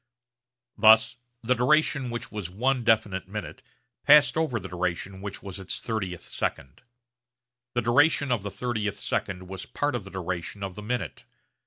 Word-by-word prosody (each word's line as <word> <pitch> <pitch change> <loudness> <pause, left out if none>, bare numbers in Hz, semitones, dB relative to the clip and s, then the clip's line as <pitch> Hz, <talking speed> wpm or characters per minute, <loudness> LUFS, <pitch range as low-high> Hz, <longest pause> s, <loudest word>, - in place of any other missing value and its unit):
Thus 110 +2 +6 0.3
the 125 +3 +3
duration 135 +1 +2
which 120 0 -5
was 105 -5 -5
one 125 +6 0
definite 105 -5 +2
minute 95 -6 -6 0.4
passed 145 -2 +7
over 160 -8 0
the 95 - -7
duration 90 +2 -3
which 100 0 -6
was 100 -1 -7
its 95 - -4
30th 95 -7 -3
second. 65 - -4 0.9
The 120 - +1
duration 140 +3 +3
of 120 -4 +1
the 100 - -4
30th 110 -2 -2
second 95 -1 -3
was 95 -1 -7
part 145 -1 -1
of 120 -4 -2
the 95 - -10
duration 95 +1 -4
of 95 -1 -4
the 105 - -8
minute. 105 - -4
105 Hz, 160 wpm, -27 LUFS, 95-125 Hz, 0.9 s, passed